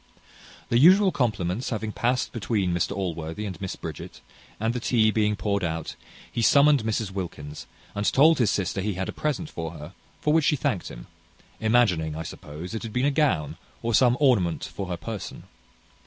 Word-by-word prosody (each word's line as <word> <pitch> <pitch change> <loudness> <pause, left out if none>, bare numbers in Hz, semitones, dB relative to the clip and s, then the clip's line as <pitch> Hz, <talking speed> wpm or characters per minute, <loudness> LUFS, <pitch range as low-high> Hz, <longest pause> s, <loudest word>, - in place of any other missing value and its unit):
The 120 - +3
usual 190 +6 +7
compliments 110 - -1
having 110 -2 -3
past 125 +3 0
between 100 -5 -1
Mr 85 - 0
Allworthy 85 +1 -4
and 95 -2 -6
Miss 95 - -4
Bridget, - - -8 0.4
and 110 +2 0
the 125 - -2
tea 110 -2 +3
being 105 -1 +1
poured 100 -1 -1
out, 80 -1 -3 0.4
he 120 - -2
summoned 140 +1 +5
Mrs 110 -2 -1
Wilkins, 80 -6 -6 0.3
and 105 0 0
told 155 +3 +5
his 115 -5 +3
sister 95 -1 -1
he 105 0 -2
had 95 +1 -3
a - - -4
present 150 +1 -2
for 80 -1 -5
her, 75 -2 -10 0.3
for 150 - +1
which 160 -2 +3
she 155 - +3
thanked 135 - -1
him - - -9 0.5
imagining, 105 -9 +2
I 80 - -4
suppose, 80 +4 -8
it 110 - -3
had 115 -2 -7
been 125 +2 +1
a 145 - +3
gown, 135 - +1 0.3
or 115 0 -1
some 125 +1 +4
ornament 110 - +2
for 100 - -4
her 90 -1 -3
person. 110 +2 -7
105 Hz, 185 wpm, -25 LUFS, 90-125 Hz, 0.5 s, usual